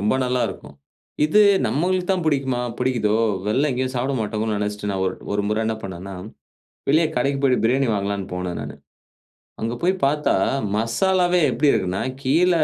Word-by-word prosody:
ரொம்ப 105 +4 +1
நல்லாருக்கும். 115 - -3 0.5
இது 180 +8 +4 0.3
நம்மளுக்கு 180 +10 0
தான் 185 -2 +1
பிடிக்குமா? 135 -4 +1 0.2
பிடிக்குதோ? 120 -4 +1 0.3
வெளில 135 +8 +2
எங்கயும் 130 +1 -2
சாப்பிட 130 +3 -1
மாட்டமோன்னு 110 0 -2
நெனச்சிட்டு 105 0 -3
நான் 95 -1 -2
ஒர் 95 - -2 0.2
ஒரு 100 0 0
முறை 105 +1 0
என்ன 110 - 0
பண்ணேன்னா, 95 0 -7 0.8
வெளிய 160 +3 +4
கடைக்கு 140 +2 0
போயிட்டு 130 -2 +3
பிரியாணி 130 +3 +2
வாங்கலாம்ன்னு 100 -1 -2
போனேன் 90 -1 -4
நானு. - - -7 0.9
அங்க 115 +1 -1
போய் 180 +2 +3
பார்த்தா 150 +2 +1 0.4
மசாலாவே 180 - +2
எப்படி 145 +2 +3
இருக்குனா, 95 0 -1 0.2
கீழ 165 +8 +3
125 Hz, 150 wpm, -22 LUFS, 105-145 Hz, 0.9 s, இது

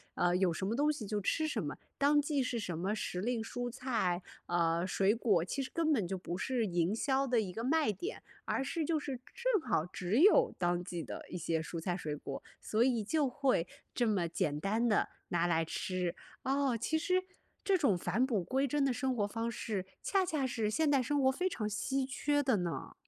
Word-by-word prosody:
呃， 175 0 +2
有 180 -2 +2
什 175 - -3
么 215 +4 0
东 295 +2 +3
西 255 -7 -6
就 210 +1 -1
吃 315 +10 +1
什 - - -1
么， - - -4 0.2
当 290 +1 +4
季 290 -1 0
是 250 -1 -1
什 180 -7 -3
么 190 +5 -1
时 180 -3 -3
令 230 +3 -1
蔬 245 +2 -4
菜， 230 -8 -1 0.2
呃， 170 +1 +1
水 195 +2 +3
果 210 -7 +2
其 275 +10 -3
实 260 - -4
根 325 -1 +2
本 220 - +2
就 190 - -2
不 175 -1 -5
是 250 +1 0
营 175 +1 +1
销 270 +3 +1
的 240 -3 +3
一 195 -4 -4
个 225 +5 -4
卖 300 -2 +3
点， 350 - -6 0.2
而 - - 0
是 315 +4 -2
就 320 +1 +1
是 275 -4 -4
正 480 -4 +1
好 155 - +2
只 180 +5 -1
有 465 +5 +6
当 175 -1 +1
季 175 -2 -4
的 - - -7
一 - - -4
些 165 -1 -1
蔬 165 +1 -5
菜 175 +1 -1
水 150 -5 -3
果， 140 -2 -6 0.2
所 215 - 0
以 240 -3 +2
就 295 +6 +1
会， 260 - +1 0.3
这 245 - +1
么 190 -6 +1
简 150 -3 -1
单 220 +7 +1
地 215 - +2 0.2
拿 175 -1 +2
来 165 -1 +2
吃， 180 +1 -2 0.3
哦， 270 -2 +1
其 280 +8 0
实， 365 +3 +1 0.4
这 390 -2 +3
种 275 - +3
返 225 +8 +1
璞 220 -8 0
归 265 +8 +1
真 285 +1 +1
的 265 - +2
生 260 +1 -1
活 205 -3 +1
方 225 +3 -2
式 210 -4 -3 0.2
恰 390 -1 +2
恰 310 -6 0
是 225 -4 -1
现 305 +8 +2
代 280 -2 +4
生 285 +4 +1
活 265 - +5
非 365 +7 0
常 220 -11 -3
稀 265 +5 -1
缺 290 +2 +1
的 260 -5 +3
呢。 175 -2 -3
230 Hz, 240 characters per minute, -33 LUFS, 180-275 Hz, 0.4 s, 有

